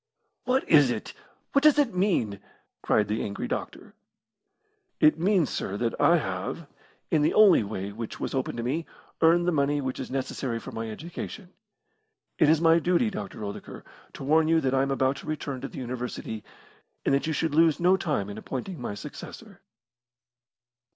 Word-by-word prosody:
"What 255 Hz, +1 st, +1 dB
is 145 Hz, -5 st, +6 dB
it? 120 Hz, -, -4 dB, 0.4 s
What 280 Hz, -, +3 dB
does 305 Hz, -1 st, +6 dB
it 275 Hz, -7 st, +2 dB
mean?" 175 Hz, -, 0 dB, 0.4 s
cried 105 Hz, -2 st, +2 dB
the 105 Hz, +2 st, -1 dB
angry 100 Hz, -1 st, -4 dB
doctor. -, -, -5 dB, 1.1 s
"It 155 Hz, +1 st, +5 dB
means, 180 Hz, -3 st, +2 dB
sir, 100 Hz, -, -3 dB
that 115 Hz, +1 st, -2 dB
I 175 Hz, -, +6 dB
have, 95 Hz, -, -4 dB, 0.5 s
in 155 Hz, -, +3 dB
the 150 Hz, -, +2 dB
only 210 Hz, -, +7 dB
way 100 Hz, -1 st, -4 dB
which 110 Hz, +2 st, -7 dB
was -, -, -3 dB
open 130 Hz, -2 st, -2 dB
to 115 Hz, -, -3 dB
me, 150 Hz, +7 st, -2 dB, 0.3 s
earned 170 Hz, +2 st, +4 dB
the -, -, +3 dB
money 145 Hz, -1 st, +1 dB
which 130 Hz, -2 st, -3 dB
is 130 Hz, -, -5 dB
necessary 130 Hz, -2 st, -3 dB
for 130 Hz, -, -9 dB
my 115 Hz, -1 st, -5 dB
education. 175 Hz, -, -7 dB, 0.9 s
It 150 Hz, -, +5 dB
is 160 Hz, 0 st, +5 dB
my 165 Hz, 0 st, +5 dB
duty, 180 Hz, +7 st, +1 dB
Dr. 190 Hz, -, -6 dB
Oldacre, 100 Hz, -1 st, -7 dB, 0.3 s
to -, -, -8 dB
warn 155 Hz, +3 st, +3 dB
you 165 Hz, 0 st, +4 dB
that 135 Hz, -2 st, 0 dB
I 135 Hz, -, +3 dB
am 135 Hz, -, 0 dB
about 135 Hz, 0 st, +1 dB
to -, -, -11 dB
return 140 Hz, -4 st, -4 dB
to -, -, -4 dB
the -, -, -11 dB
University, 125 Hz, -3 st, -5 dB, 0.6 s
and -, -, +2 dB
that 140 Hz, +3 st, +1 dB
you 160 Hz, -, 0 dB
should 160 Hz, +1 st, -1 dB
lose 160 Hz, 0 st, +4 dB
no 180 Hz, +2 st, +5 dB
time 145 Hz, -, -1 dB
in 105 Hz, +1 st, -7 dB
appointing 135 Hz, -, -6 dB
my 105 Hz, -, -4 dB
successor." 105 Hz, -, -10 dB
140 Hz, 185 wpm, -27 LUFS, 120-170 Hz, 1.1 s, only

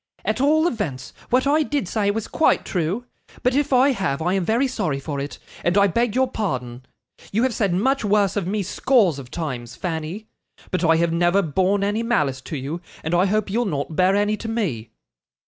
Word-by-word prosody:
At 215 Hz, +5 st, 0 dB
all 310 Hz, +3 st, +4 dB
events, 170 Hz, -, -4 dB, 0.2 s
what 255 Hz, +2 st, +3 dB
I 295 Hz, +3 st, +3 dB
did 290 Hz, -, -1 dB
say 205 Hz, +1 st, 0 dB
was 215 Hz, +1 st, -2 dB
quite 320 Hz, -, +2 dB
true; 185 Hz, +7 st, -2 dB, 0.4 s
but 250 Hz, -, +2 dB
if 285 Hz, +1 st, +1 dB
I 265 Hz, +2 st, +5 dB
have, 185 Hz, -, -1 dB
I 175 Hz, +3 st, 0 dB
am 195 Hz, -2 st, +1 dB
very 235 Hz, +8 st, +2 dB
sorry 185 Hz, -, -2 dB
for 140 Hz, 0 st, -4 dB
it, 140 Hz, +1 st, -5 dB, 0.3 s
and 175 Hz, +3 st, +2 dB
I 200 Hz, -, +6 dB
beg 230 Hz, +4 st, +1 dB
your 260 Hz, 0 st, +3 dB
pardon. 130 Hz, -, -4 dB, 0.5 s
You 225 Hz, +4 st, +1 dB
have 260 Hz, -2 st, +1 dB
said 200 Hz, -3 st, 0 dB
much 260 Hz, +10 st, +1 dB
worse 205 Hz, -2 st, +2 dB
of 200 Hz, -4 st, -1 dB
me, 205 Hz, +1 st, -1 dB
scores 195 Hz, -, +2 dB
of 130 Hz, -3 st, -10 dB
times, 130 Hz, -8 st, -5 dB
Fanny; 170 Hz, +4 st, -4 dB, 0.5 s
but 185 Hz, -, -1 dB
I 165 Hz, -1 st, +5 dB
have 165 Hz, 0 st, +1 dB
never 175 Hz, +3 st, +3 dB
borne 190 Hz, +5 st, +1 dB
any 205 Hz, +3 st, 0 dB
malice 150 Hz, -, 0 dB
to 155 Hz, -, -3 dB
you, 145 Hz, +6 st, -5 dB, 0.2 s
and 160 Hz, -, -2 dB
I 180 Hz, +3 st, +4 dB
hope 210 Hz, 0 st, 0 dB
you'll 240 Hz, +3 st, +1 dB
not 155 Hz, -4 st, -3 dB
bear 185 Hz, +3 st, +3 dB
any 205 Hz, +1 st, +1 dB
to 225 Hz, -, -6 dB
me. 160 Hz, -, -2 dB
195 Hz, 210 wpm, -22 LUFS, 160-230 Hz, 0.5 s, I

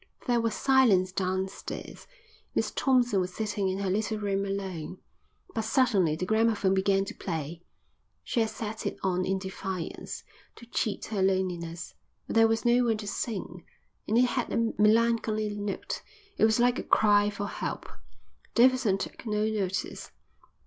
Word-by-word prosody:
There 240 Hz, -2 st, +2 dB
was 230 Hz, -1 st, 0 dB
silence 235 Hz, -9 st, +4 dB
downstairs. 190 Hz, 0 st, -4 dB, 0.5 s
Miss -, -, +1 dB
Thompson 245 Hz, -6 st, +2 dB
was 180 Hz, 0 st, -4 dB
sitting 210 Hz, -3 st, -1 dB
in 185 Hz, -, -2 dB
her 195 Hz, -1 st, -1 dB
little 215 Hz, +2 st, 0 dB
room 200 Hz, -1 st, -1 dB
alone. 190 Hz, -4 st, -4 dB, 0.6 s
But -, -, 0 dB
suddenly 215 Hz, -, +3 dB
the 185 Hz, -, -3 dB
gramophone 220 Hz, -2 st, +2 dB
began 195 Hz, 0 st, +2 dB
to -, -, -6 dB
play. 165 Hz, -2 st, -5 dB, 0.6 s
She -, -, -1 dB
had 225 Hz, -1 st, +2 dB
set 220 Hz, 0 st, -5 dB
it -, -, -4 dB
on 185 Hz, -1 st, +1 dB
in 190 Hz, 0 st, 0 dB
defiance, 190 Hz, -2 st, -5 dB, 0.3 s
to 235 Hz, -, -13 dB
cheat 220 Hz, -3 st, -2 dB
her 200 Hz, -, 0 dB
loneliness, 180 Hz, -3 st, -1 dB, 0.3 s
but -, -, -5 dB
there 225 Hz, 0 st, +7 dB
was 225 Hz, +2 st, 0 dB
no 240 Hz, +1 st, +4 dB
one 225 Hz, -2 st, +2 dB
to 210 Hz, -1 st, -7 dB
sing, 190 Hz, -5 st, -4 dB, 0.4 s
and 220 Hz, -, +2 dB
it 250 Hz, -, +6 dB
had 250 Hz, 0 st, -1 dB
a 230 Hz, -1 st, +1 dB
melancholy 215 Hz, -1 st, +3 dB
note. 205 Hz, -1 st, -4 dB, 0.3 s
It -, -, +4 dB
was 220 Hz, +1 st, +3 dB
like 245 Hz, +1 st, +3 dB
a -, -, -3 dB
cry 205 Hz, -1 st, +4 dB
for 205 Hz, 0 st, -4 dB
help. -, -, -4 dB, 0.7 s
Davidson 245 Hz, -5 st, +4 dB
took -, -, -6 dB
no 210 Hz, 0 st, +1 dB
notice. 195 Hz, -4 st, -2 dB
205 Hz, 160 wpm, -28 LUFS, 190-225 Hz, 0.7 s, there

